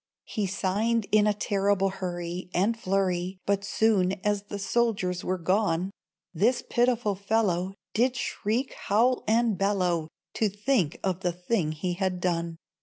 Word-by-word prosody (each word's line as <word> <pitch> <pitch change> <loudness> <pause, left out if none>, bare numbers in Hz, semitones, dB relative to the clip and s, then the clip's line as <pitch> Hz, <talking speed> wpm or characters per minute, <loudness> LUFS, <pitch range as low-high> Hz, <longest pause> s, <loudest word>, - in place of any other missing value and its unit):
He 210 -2 -2
signed 205 +4 0
in 210 0 +5
a 210 - +3
terrible 200 -1 +1
hurry, 180 -1 -5
And 205 +6 +2
flurry; 185 -3 -1
But 200 0 +1
soon 200 -3 +2
as 205 -1 +1
the 205 - -5
soldiers 195 -3 0
were 185 - -1
gone, 185 0 +1 0.4
This 225 +9 +2
pitiful 240 -3 +2
fellow 195 -2 0 0.2
Did 245 +3 +2
shriek, 235 +2 -2
howl 240 +5 +2
and 225 -2 +2
bellow, 180 -5 +1 0.3
To 220 - +1
think 205 - 0
of 185 -2 0
the 180 -2 0
thing 180 -2 -1
he 175 +3 -2
had 185 0 -1
done. 170 -2 -1
195 Hz, 145 wpm, -27 LUFS, 180-215 Hz, 0.4 s, in